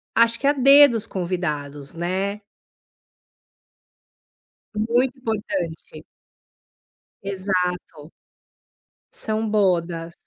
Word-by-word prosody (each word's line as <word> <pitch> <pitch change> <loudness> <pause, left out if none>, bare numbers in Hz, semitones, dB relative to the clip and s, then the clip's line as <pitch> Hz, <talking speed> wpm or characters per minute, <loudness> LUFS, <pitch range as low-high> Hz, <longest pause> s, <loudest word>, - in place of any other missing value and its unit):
acho 230 0 +3
que 275 - 0
a 285 - +5
dedo 275 -1 +7
os 220 - -2
convidados, 150 -6 -4
né. 190 +4 -3 2.3
Muito 240 +5 0
importante. 200 -8 -4 1.2
Exato. 180 -5 -3 1.0
São 220 0 -2
bodas. 170 -5 0
195 Hz, 70 wpm, -22 LUFS, 170-225 Hz, 2.3 s, dedo